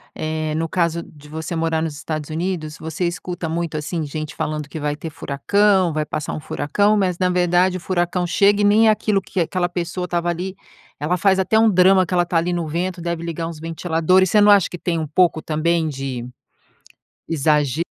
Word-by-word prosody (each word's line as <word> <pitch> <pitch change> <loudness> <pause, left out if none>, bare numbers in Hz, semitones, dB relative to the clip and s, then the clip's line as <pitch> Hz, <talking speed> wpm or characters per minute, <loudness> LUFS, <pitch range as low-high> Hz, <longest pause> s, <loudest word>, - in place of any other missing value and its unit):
eh, 155 0 -2
no 165 +1 -1
caso 170 -1 0
de 150 -1 -16
você 160 +2 -5
morar 165 0 0
nos 160 -2 -3
Estados 155 +1 -5
Unidos, 160 -2 -3
você 160 +3 -3
escuta 175 0 -4
muito 165 -1 -2
assim, 160 +2 -3
gente 155 +1 -5
falando 150 -1 -3
que 155 - -7
vai 145 0 -1
ter 160 +2 -7
furacão, 185 +5 +1
vai 155 0 -1
passar 150 0 -4
um - - -4
furacão, 205 +8 +1
mas 185 -3 0
na 185 -1 +2
verdade 180 +1 +2
o - - -8
furacão 175 0 -1
chega 200 +4 +3
e - - +2
nem 215 +2 +5
é - - +7
aquilo 210 -2 +1
que 185 - -3
aquela 175 +2 -1
pessoa 180 +1 -3
estava 175 -1 -2
ali, 180 +3 -3 0.4
ela 165 +5 0
faz 190 +2 +3
até 205 +3 +2
um 225 0 +5
drama, 185 0 +5
que 180 +1 -3
ela 175 - +4
está 175 -1 -1
ali 170 +2 +1
no 170 -2 -2
vento, 175 +3 -2
deve 170 -1 -3
ligar 165 0 -4
uns 165 -2 -8
ventiladores, 165 +3 +1
você 210 - +5
não 205 0 +7
acha 200 -4 +5
que 175 - -8
tem 165 -2 -1
pouco 165 +2 +2
também 160 +1 0
de 135 -4 -4 1.0
exagero, 150 -1 +1
170 Hz, 205 wpm, -21 LUFS, 155-185 Hz, 1.0 s, é